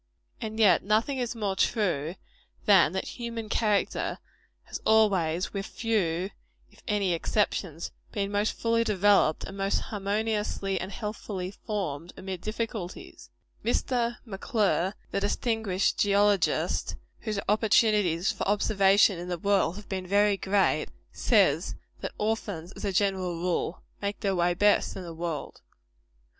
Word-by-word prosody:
And 220 0 -5
yet 210 -4 +6
nothing 225 +7 +1
is 240 -1 -2
more 205 -4 -1
true, 175 - 0 0.5
than 195 -6 +6
that 190 - -2
human 230 -2 -5
character 210 -3 0 0.5
has - - -7
always, 190 -6 +2
with 195 -1 -3
few 190 -5 -1 0.4
if - - -20
any 205 -5 +1
exceptions, 170 -2 -1 0.2
been 200 -1 -2
most 205 +1 +1
fully 230 0 +1
developed 205 -6 +3
and 195 - -7
most 195 0 0
harmoniously 210 -1 -2
and 190 - -5
healthfully 205 -4 -5
formed, 180 -6 -4
amid 190 -2 -6
difficulties. 215 -3 -5 0.3
Mr. 240 -2 0
M'Clure, 200 -3 0 0.2
the - - 0
distinguished 205 -1 0
geologist, 205 -2 +2 0.2
whose 215 -3 -3
opportunities 210 -5 +3
for - - -4
observation 200 -2 +4
in 175 - -6
the 175 -1 -2
world 195 -1 +2
have 210 0 -10
been 185 -2 -4
very 205 +1 +4
great, 195 0 +1 0.2
says - - +2 0.2
that - - -4
orphans, 205 -6 -2
as - - -10
a 200 - 0
general 190 -2 0
rule, 175 0 -2 0.2
make 200 0 -3
their 195 -3 +1
way 175 0 +2
best 205 +3 +3
in 190 - -6
the 170 -1 -7
world. 165 -2 -5
200 Hz, 135 wpm, -28 LUFS, 185-215 Hz, 0.5 s, yet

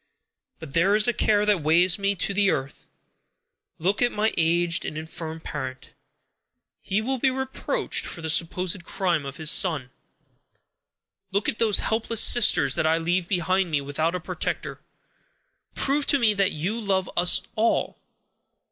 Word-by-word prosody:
But 160 -4 -11
there 190 +5 +2
is 215 +1 +5
a 240 - +1
care 210 -2 +1
that 205 -5 +1
weighs 170 +5 +2
me 200 0 0
to 200 +2 -1
the 200 0 +2
earth. 135 -3 -4 0.9
Look 190 +6 -1
at 245 0 +2
my 215 +1 -1
aged 170 +1 +1
and 155 - -6
infirm 160 0 -7
parent. 130 -5 -7 0.9
He 210 +3 -2
will 260 +2 -2
be 265 - +2
reproached 265 - -2
for 170 - -6
the 160 - -3
supposed 180 +2 0
crime 170 -6 -2
of 135 - -8
his 160 -2 +3
son. 155 -9 +2 1.4
Look 200 +1 -1
at - - -2
those 220 -3 +3
helpless 225 0 +1
sisters 175 - +4
that 155 - 0
I 160 +1 +2
leave 170 +2 -1
behind 185 0 0
me 150 -3 0
without 150 +5 -2
a - - -3
protector. 165 - -5 0.9
Prove 280 +1 +2
to 280 - +3
me 230 -5 +2
that 195 -1 0
you 190 +10 -3
love 190 -3 0
us 175 +1 +3
all. 225 +1 0
185 Hz, 160 wpm, -24 LUFS, 160-210 Hz, 1.4 s, is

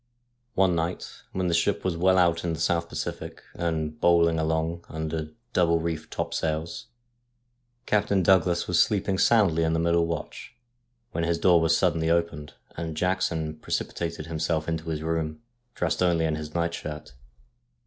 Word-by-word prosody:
One 95 -2 +4
night, 85 +2 -3
when 95 0 -2
the 85 - +1
ship 90 +5 +1
was 90 -3 0
well 95 +2 +3
out 85 -2 +3
in 85 -2 -1
the 80 - -5
South 85 0 0
Pacific, - - -5
and 80 -2 -3
bowling 85 -1 +4
along 80 +2 -1
under 80 0 -4 0.2
double 85 -2 +3
reefed 80 -1 -3
top - - -3
sails, 80 +7 -3 1.0
Captain 100 -2 +2
Douglas 90 -1 +3
was 90 -1 +2
sleeping 100 -2 +2
soundly 100 -8 +4
in 80 0 +1
the 80 - +1
middle 85 0 +2
watch, 85 +8 -6 0.6
when 85 - -2
his 85 0 +1
door 85 -1 +4
was 80 0 +3
suddenly 80 -3 +1
opened, 85 -3 -1 0.2
and 80 -1 -5
Jackson 80 -4 -1
precipitated 85 -2 -3
himself 80 -1 -1
into 80 0 -3
his 80 -1 -3
room, 80 +3 -2 0.3
dressed 90 0 -1
only 85 -3 +3
in 80 - 0
his 75 0 -7
night 85 0 0
shirt. 75 -4 -7
85 Hz, 160 wpm, -26 LUFS, 80-85 Hz, 1.0 s, One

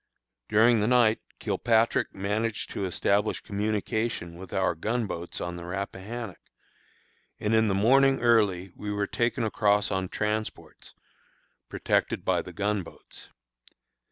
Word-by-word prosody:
During 115 +2 +5
the 105 - +1
night 120 -3 +4 0.2
Kilpatrick 115 +1 +1
managed 105 +3 -2
to 100 - -3
establish 100 +3 +1
communication 105 -2 -2
with 90 +1 -10
our 95 0 +1
gun 110 +8 -1
boats 85 -3 -5
on 85 0 -4
the 85 - -8
Rappahannock, 100 +3 -5 1.0
and 105 +1 0
in 110 0 +4
the 100 - +1
morning 135 +6 +4
early 100 -6 +2
we 105 - -5
were 105 0 0
taken 120 +3 -1
across 105 -1 +2
on 95 -1 -1
transports, 105 +1 -4 0.7
protected - - 0
by - - +2
the - - -10
gun 105 0 -1
boats. 85 - -13
105 Hz, 130 wpm, -27 LUFS, 95-115 Hz, 1.0 s, During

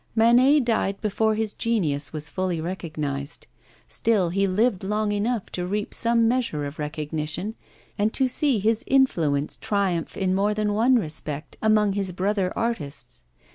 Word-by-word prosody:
Manet 245 +6 +5
died 200 -4 0
before 220 0 +1
his 220 -1 -2
genius 155 - -1
was 155 -1 -6
fully 180 +2 -2
recognised; 155 -5 -4 0.4
still 205 -7 +1
he 195 +3 +1
lived 200 +1 +1
long 210 +2 0
enough 210 +1 -1
to 180 0 -3
reap 205 +2 -3
some 230 -1 +3
measure 235 -11 0
of 140 +2 -7
recognition 155 +5 -3 0.5
and 210 +2 +2
to 265 - +2
see 265 0 +2
his 220 +4 +1
influence 160 - +2
triumph 195 -5 -1
in 185 -1 +1
more 205 +2 +1
than 210 -1 0
one 235 +5 +4
respect 155 - -2
among 215 -2 +3
his 195 -2 -1
brother 190 0 0
artists. 145 - -4
200 Hz, 150 wpm, -24 LUFS, 160-225 Hz, 0.5 s, Manet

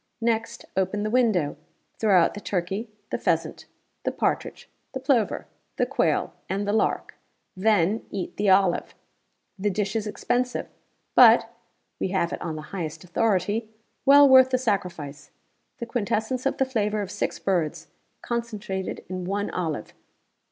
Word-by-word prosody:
Next, 230 0 -1
open 190 +2 0
the 215 - -2
window. 215 - +2 0.4
Throw 205 -5 +5
out 165 - +3
the 205 - -7
turkey, 195 +5 -2 0.2
the - - -1
pheasant, - - -1 0.3
the - - -1
partridge, - - -2 0.3
the 265 - -3
plover, 255 -5 +1 0.3
the - - +1
quail, - - 0 0.2
and 200 +2 -1
the 205 - +1
lark. 220 - 0 0.4
Then, 205 0 +2
eat 195 -3 -5
the 205 -1 +1
olive. 190 -2 +3 0.6
The 205 +2 +1
dish 200 +1 -2
is 220 -1 -1
expensive, 245 +4 -1 0.5
but - - +7 0.5
(we - - 0
have 185 -2 0
it - - -5
on 160 -2 -3
the 155 - -6
highest 165 -4 -4
authority) 205 +3 0 0.3
well 285 +1 +8
worth 260 -1 +8
the 255 - +2
sacrifice. 170 - -3 0.5
The 235 - -5
quintessence 235 +2 -1
of - - -1
the 265 - +2
flavor 215 -5 -1
of 190 - -7
six - - -2
birds, 170 -4 -1 0.4
concentrated 210 -5 -4
in 185 0 -5
one 200 +2 -2
olive. 160 -10 -3
205 Hz, 150 wpm, -25 LUFS, 185-230 Hz, 0.6 s, well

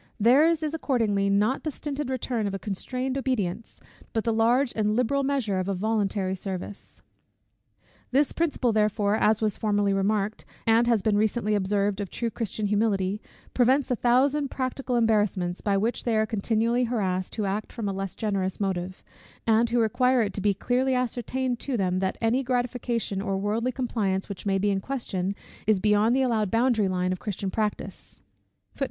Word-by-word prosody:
Their's 300 +9 +4
is 305 0 -2
accordingly 225 -10 +1
not 210 +6 +2
the 310 - -1
stinted 290 -1 -4
return 245 -4 -1
of 195 - -3
a - - -1
constrained 255 +7 -3
obedience, 225 -7 -2 0.3
but 225 - 0
the 230 - +1
large 240 +4 +2
and 210 -1 +1
liberal 250 +4 +1
measure 265 -9 0
of 185 +1 -2
a 195 - 0
voluntary 200 -1 0
service. 190 +1 -7 1.1
This 280 +3 +2
principle, 295 -7 0
therefore, 210 -1 +2
as 220 0 +2
was 215 -2 0
formerly 205 -2 +1
remarked, 205 +2 0 0.2
and 230 +1 +4
has 230 -5 +2
been 210 -2 +2
recently 215 0 +1
observed 200 0 0
of 200 - -4
true 235 -1 -3
Christian 215 -2 -3
humility, 205 -1 0 0.3
prevents 260 +2 +3
a - - +3
thousand 270 +5 +2
practical 255 -1 -3
embarrassments, 210 -6 +1
by 200 -1 +1
which 225 +5 -1
they 230 -2 +1
are 215 - +3
continually 225 +3 +1
harassed, 190 -6 -2
who 215 - -1
act 200 +2 -3
from 225 -4 -4
a 195 - -1
less 195 -1 -4
generous 195 -4 -2
motive; 185 -2 -3 0.4
and 225 +1 +3
who 240 +1 +1
require 245 +2 +3
it 200 -2 -3
to 200 - -4
be 200 0 +2
clearly 255 +5 +1
ascertained 250 0 -1
to 270 -3 -2
them, 185 -2 0
that 190 0 -1
any 235 +3 +2
gratification 245 -5 -1
or 195 -1 -1
worldly 215 +5 -1
compliance, 215 -7 -1
which 200 0 -7
may 195 -1 +2
be 205 +1 +1
in 195 - 0
question, 200 -6 -3 0.3
is 215 -3 +4
beyond 210 +4 +3
the 265 - +3
allowed 220 -5 +1
boundary 225 -1 +2
line 185 -1 0
of 185 - -3
Christian 200 -2 -4
practice. 215 0 -4
220 Hz, 175 wpm, -26 LUFS, 200-245 Hz, 1.1 s, Their's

